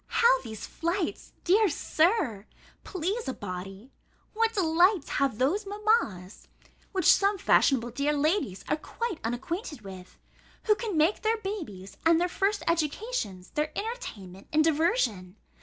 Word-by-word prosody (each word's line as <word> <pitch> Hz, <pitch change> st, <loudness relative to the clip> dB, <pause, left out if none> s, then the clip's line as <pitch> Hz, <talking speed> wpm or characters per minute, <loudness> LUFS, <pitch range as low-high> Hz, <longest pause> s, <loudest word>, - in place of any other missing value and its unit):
How -, -, +4 dB
these 220 Hz, -1 st, -7 dB
flights, 340 Hz, +1 st, -3 dB
dear 410 Hz, +3 st, +4 dB
Sir, 310 Hz, -, +1 dB, 0.4 s
please 390 Hz, +6 st, -3 dB
a 265 Hz, -, -3 dB
body! 195 Hz, +5 st, -7 dB, 0.4 s
What 450 Hz, +1 st, +1 dB
delights 350 Hz, -1 st, +3 dB
have 270 Hz, -6 st, +1 dB
those 350 Hz, -, 0 dB
mammas 405 Hz, -, -1 dB, 0.4 s
(which 375 Hz, -4 st, -1 dB
some 400 Hz, +1 st, +5 dB
fashionable 245 Hz, -9 st, +3 dB
dear 280 Hz, +5 st, 0 dB
ladies 295 Hz, -, 0 dB
are -, -, +1 dB
quite 460 Hz, +3 st, -4 dB
unacquainted 265 Hz, -, -4 dB
with) 190 Hz, -2 st, -11 dB, 0.5 s
who 430 Hz, -, +4 dB
can 420 Hz, -5 st, -3 dB
make 320 Hz, +7 st, +2 dB
their 445 Hz, +1 st, +1 dB
babies, 325 Hz, -, -6 dB
and 330 Hz, 0 st, +5 dB
their 355 Hz, -, +2 dB
first 405 Hz, +3 st, 0 dB
educations, 320 Hz, -, -2 dB
their 300 Hz, +1 st, -1 dB
entertainment 210 Hz, -, -6 dB
and 310 Hz, 0 st, +4 dB
diversion! 295 Hz, -, +1 dB
325 Hz, 135 wpm, -28 LUFS, -, 0.5 s, some